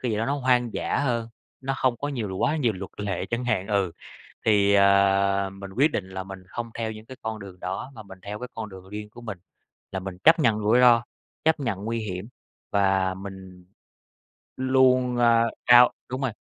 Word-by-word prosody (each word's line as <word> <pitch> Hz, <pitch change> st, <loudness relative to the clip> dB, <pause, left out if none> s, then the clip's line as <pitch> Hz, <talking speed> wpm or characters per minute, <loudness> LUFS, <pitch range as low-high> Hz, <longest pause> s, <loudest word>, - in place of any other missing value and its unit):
cái 125 Hz, -, -1 dB
gì 105 Hz, -, -1 dB
đó 115 Hz, -, -1 dB
nó 140 Hz, -, 0 dB
hoang 125 Hz, -3 st, +1 dB
dã -, -, -1 dB
hơn, 120 Hz, -5 st, -1 dB, 0.3 s
nó 135 Hz, 0 st, -2 dB
hông 130 Hz, -2 st, +1 dB
có 145 Hz, -, -4 dB
nhiều 110 Hz, -9 st, -4 dB
quá 155 Hz, -, +1 dB
nhiều 125 Hz, -7 st, +1 dB
luật 95 Hz, -1 st, -7 dB
lệ 95 Hz, -3 st, -2 dB
chẳng 115 Hz, +5 st, -2 dB
hạn, 110 Hz, -6 st, 0 dB
ừ. 100 Hz, -4 st, +1 dB, 0.5 s
Thì, 100 Hz, -2 st, +4 dB
ờ, 100 Hz, 0 st, +4 dB
mình 95 Hz, 0 st, -9 dB
quyết 140 Hz, +9 st, +3 dB
định 95 Hz, -2 st, -3 dB
là 95 Hz, 0 st, -5 dB
mình 95 Hz, 0 st, -9 dB
hông 120 Hz, -1 st, -5 dB
theo 115 Hz, -1 st, -2 dB
những 110 Hz, 0 st, -10 dB
cái 130 Hz, +2 st, -11 dB
con 110 Hz, -1 st, -4 dB
đường 95 Hz, -3 st, -11 dB
đó 95 Hz, +9 st, -5 dB
mà 110 Hz, -, -9 dB
mình 95 Hz, -2 st, -13 dB
theo 105 Hz, +2 st, -6 dB
cái 125 Hz, -, -6 dB
con 110 Hz, -2 st, -6 dB
đường 95 Hz, -1 st, -12 dB
riêng 105 Hz, +1 st, -7 dB
của 120 Hz, +3 st, -13 dB
mình, 105 Hz, -5 st, -6 dB, 0.6 s
là 95 Hz, -, -2 dB
mình 95 Hz, -1 st, -7 dB
chấp 160 Hz, +2 st, +7 dB
nhận 115 Hz, -7 st, +3 dB
rủi 110 Hz, +4 st, +3 dB
ro, 120 Hz, -2 st, +6 dB, 0.4 s
chấp 160 Hz, -1 st, +3 dB
nhận 105 Hz, -7 st, -3 dB
nguy 115 Hz, +1 st, -2 dB
hiểm 100 Hz, -1 st, -5 dB, 0.4 s
và 95 Hz, -2 st, +2 dB
mình 95 Hz, -1 st, -10 dB, 0.9 s
luôn, 130 Hz, -1 st, +3 dB
a, 115 Hz, -1 st, +5 dB, 0.2 s
cao 120 Hz, 0 st, +8 dB, 0.2 s
đúng 130 Hz, +1 st, -4 dB
rồi. 130 Hz, -3 st, 0 dB
110 Hz, 210 wpm, -25 LUFS, 95-125 Hz, 0.9 s, cao